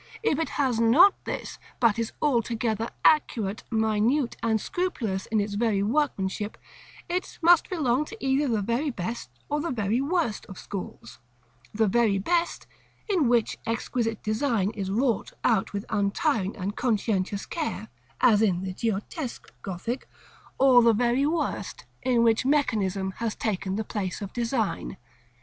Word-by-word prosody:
If 315 Hz, -9 st, +2 dB
it 325 Hz, -, -1 dB
has 260 Hz, -5 st, +1 dB
not 290 Hz, -, +7 dB
this, -, -, -5 dB, 0.2 s
but 230 Hz, -2 st, +3 dB
is 230 Hz, -, -2 dB
altogether 230 Hz, -4 st, 0 dB, 0.2 s
accurate, 225 Hz, -9 st, +2 dB
minute, 225 Hz, +4 st, +1 dB
and 220 Hz, -1 st, +1 dB
scrupulous 225 Hz, -, -2 dB
in 220 Hz, -1 st, +1 dB
its 205 Hz, 0 st, -2 dB
workmanship, 210 Hz, -1 st, 0 dB, 0.5 s
it 360 Hz, +1 st, -3 dB
must 345 Hz, 0 st, +6 dB
belong 295 Hz, -5 st, +1 dB
to 450 Hz, -, -10 dB
either 270 Hz, 0 st, +1 dB
the 220 Hz, -5 st, 0 dB
very 235 Hz, +8 st, 0 dB
best 225 Hz, -, -4 dB, 0.2 s
or 295 Hz, +1 st, -1 dB
the 335 Hz, -, -2 dB
very 225 Hz, 0 st, 0 dB
worst 300 Hz, -6 st, -1 dB
of 190 Hz, -, -10 dB
schools: 185 Hz, -, -8 dB, 0.5 s
the 220 Hz, +1 st, +2 dB
very 215 Hz, -1 st, +3 dB
best, 340 Hz, -, 0 dB, 0.4 s
in 360 Hz, -, +2 dB
which 235 Hz, -2 st, +1 dB
exquisite 230 Hz, -1 st, -2 dB
design 215 Hz, -3 st, 0 dB
is 200 Hz, -4 st, -4 dB
wrought 230 Hz, +2 st, 0 dB
out 220 Hz, -5 st, +2 dB
with 200 Hz, 0 st, -4 dB
untiring 205 Hz, -, 0 dB
and 200 Hz, +1 st, -3 dB
conscientious 205 Hz, -4 st, 0 dB
care, 305 Hz, -9 st, -4 dB, 0.3 s
as 220 Hz, -4 st, +5 dB
in 190 Hz, -4 st, +2 dB
the 190 Hz, -1 st, -4 dB
Giottesque 230 Hz, -, -4 dB
Gothic; 200 Hz, +7 st, -5 dB, 0.5 s
or 260 Hz, -2 st, +6 dB
the 230 Hz, -1 st, +5 dB
very 245 Hz, +5 st, +2 dB
worst, 330 Hz, +2 st, -2 dB, 0.2 s
in 245 Hz, -2 st, +2 dB
which 225 Hz, 0 st, +3 dB
mechanism 205 Hz, -9 st, +1 dB
has 230 Hz, -2 st, -2 dB
taken 195 Hz, -3 st, -2 dB
the 220 Hz, -, -1 dB
place 200 Hz, -4 st, -4 dB
of 200 Hz, -2 st, -7 dB
design. 230 Hz, -, -2 dB
230 Hz, 145 wpm, -26 LUFS, 205-265 Hz, 0.5 s, not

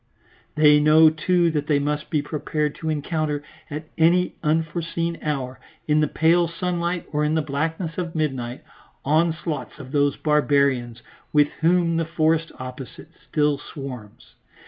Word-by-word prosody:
They 150 Hz, -1 st, +6 dB
know, 155 Hz, +1 st, +6 dB
too, 170 Hz, +2 st, +2 dB
that 150 Hz, -1 st, -2 dB
they 150 Hz, -, +3 dB
must 150 Hz, +1 st, -2 dB
be 150 Hz, -2 st, 0 dB
prepared 150 Hz, 0 st, -2 dB
to 160 Hz, -, -3 dB
encounter 150 Hz, -1 st, -2 dB, 0.3 s
at 150 Hz, +1 st, -5 dB
any 175 Hz, +3 st, +3 dB
unforeseen 165 Hz, +1 st, -1 dB
hour, 135 Hz, -4 st, -3 dB, 0.3 s
in 150 Hz, 0 st, +3 dB
the 150 Hz, -, +3 dB
pale 170 Hz, +4 st, +3 dB
sunlight 175 Hz, +1 st, -2 dB
or 150 Hz, 0 st, 0 dB
in 150 Hz, +1 st, +1 dB
the 160 Hz, -, +2 dB
blackness 160 Hz, +4 st, -3 dB
of 170 Hz, -2 st, -4 dB
midnight, 130 Hz, -6 st, -2 dB, 0.4 s
onslaughts 160 Hz, +1 st, 0 dB
of 130 Hz, -3 st, -10 dB
those 145 Hz, -1 st, +2 dB
barbarians 140 Hz, -6 st, +1 dB, 0.3 s
with 150 Hz, -1 st, +4 dB
whom 170 Hz, 0 st, +2 dB
the 165 Hz, -, 0 dB
forest 165 Hz, 0 st, +1 dB
opposite 130 Hz, +4 st, -9 dB, 0.2 s
still 150 Hz, -2 st, +1 dB
swarms. 130 Hz, -9 st, -9 dB
155 Hz, 145 wpm, -23 LUFS, 145-165 Hz, 0.4 s, They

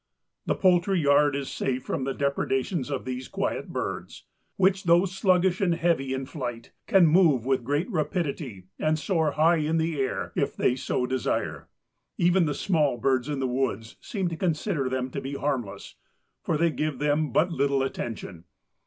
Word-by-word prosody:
The -, -, +1 dB
poultry 185 Hz, 0 st, +3 dB
yard 145 Hz, -1 st, +4 dB
is 140 Hz, -1 st, -3 dB
safe 130 Hz, -1 st, -2 dB
from 130 Hz, -, -3 dB
the 135 Hz, -, -1 dB
depredations 140 Hz, +1 st, -1 dB
of 135 Hz, -3 st, -3 dB
these 130 Hz, 0 st, -4 dB
quiet -, -, -2 dB
birds, -, -, -5 dB, 0.3 s
which, 190 Hz, 0 st, +2 dB
though 170 Hz, +2 st, +5 dB
sluggish 185 Hz, -1 st, +2 dB
and 175 Hz, -3 st, +2 dB
heavy 165 Hz, -6 st, 0 dB
in 130 Hz, 0 st, -4 dB
flight, 120 Hz, -5 st, -6 dB, 0.2 s
can 190 Hz, -3 st, +6 dB
move 155 Hz, -7 st, +4 dB
with 130 Hz, -2 st, +1 dB
great 145 Hz, +7 st, 0 dB
rapidity 150 Hz, -, -3 dB, 0.2 s
and 155 Hz, 0 st, +1 dB
soar 160 Hz, -2 st, 0 dB
high 165 Hz, +2 st, +4 dB
in 155 Hz, +1 st, 0 dB
the 160 Hz, -2 st, -1 dB
air 130 Hz, -, -2 dB
if -, -, -1 dB
they 125 Hz, -, +2 dB
so 130 Hz, -1 st, -1 dB
desire. 130 Hz, -1 st, -2 dB, 0.5 s
Even 175 Hz, 0 st, +3 dB
the 145 Hz, -, -1 dB
small 155 Hz, -9 st, +1 dB
birds 130 Hz, +2 st, +1 dB
in 145 Hz, -, -2 dB
the 135 Hz, -, -1 dB
woods 125 Hz, -3 st, -2 dB
seem 195 Hz, -4 st, -2 dB
to 165 Hz, -, -4 dB
consider 155 Hz, -5 st, -1 dB
them 130 Hz, 0 st, -2 dB
to -, -, -4 dB
be 135 Hz, +1 st, -5 dB
harmless, 120 Hz, -9 st, -3 dB, 0.4 s
for 160 Hz, -, 0 dB
they 170 Hz, +1 st, +2 dB
give 155 Hz, -3 st, -2 dB
them 150 Hz, +1 st, +1 dB
but 175 Hz, +3 st, +2 dB
little 140 Hz, -3 st, +1 dB
attention. 105 Hz, -9 st, -5 dB
145 Hz, 175 wpm, -26 LUFS, 130-170 Hz, 0.5 s, can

